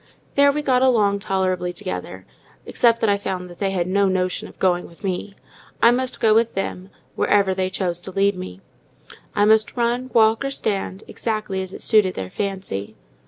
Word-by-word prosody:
There 280 0 +5
we 300 +1 -3
got 255 -3 +2
along 215 -6 +3
tolerably 185 -3 -1
together, 185 +1 -6 0.4
except 230 -1 +2
that 225 - +2
I 200 - +1
found 180 -2 -4
they 195 +3 -2
had 185 -3 -1
no 195 +2 +2
notion 185 -1 -1
of - - -16
going 180 -2 +1
with 170 - -19
me: 195 +1 -3 0.4
I 235 - +6
must 255 +1 -1
go 220 -1 +4
with 230 +1 +2
them, 190 -1 -4 0.2
wherever 200 -2 +2
they 185 0 -1
chose 180 -2 -2
to 190 - -8
lead 200 +1 +2
me. 95 - -8 0.7
I 205 - +4
must 220 +2 +3
run, 240 +2 0
walk, 225 +1 +4
or 275 - -1
stand, 200 -6 -3
exactly 215 -4 -3
as 190 -1 -6
it - - -6
suited 210 -5 +4
their 95 -1 -5
fancy. 190 - -4
200 Hz, 185 wpm, -22 LUFS, 185-225 Hz, 0.7 s, I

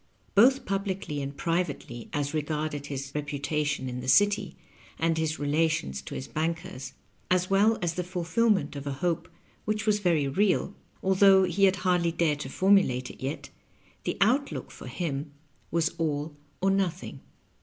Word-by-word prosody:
Both 260 +6 +5
publicly 195 -6 -2
and 140 +1 -5
privately, 160 -8 -2
as 145 -1 -2
regarded 150 -1 -2
his 135 -1 -5
reputation 150 -1 -2
in 125 0 -4
the 130 - -7
city, 205 +4 +3 0.4
and 165 0 +1
his 160 -1 -1
relations 145 - 0
to - - -8
his 130 - -5
bankers, 155 -5 -3 0.4
as 185 +1 +1
well 210 +3 +4
as 170 -1 0
the 180 - -2
fulfillment 180 +3 +1
of 140 0 -6
a 140 - -1
hope 170 +3 -2 0.3
which 215 0 -1
was 210 -1 +3
very 170 -7 +2
real, 195 +6 +1 0.3
although 190 0 +6
he 195 +1 +3
had 190 0 +4
hardly 175 -2 +3
dared 165 -3 +1
to 130 - -5
formulate 185 -9 +3
it - - -16
yet, 135 +3 -4 0.5
the - - -2
out 255 +8 +3
look - - -6
for - - -10
him 145 -4 -4 0.4
was 170 0 +1
all 150 -1 -1 0.3
or 195 +1 +3
nothing. 190 -2 -1
165 Hz, 160 wpm, -28 LUFS, 145-190 Hz, 0.5 s, although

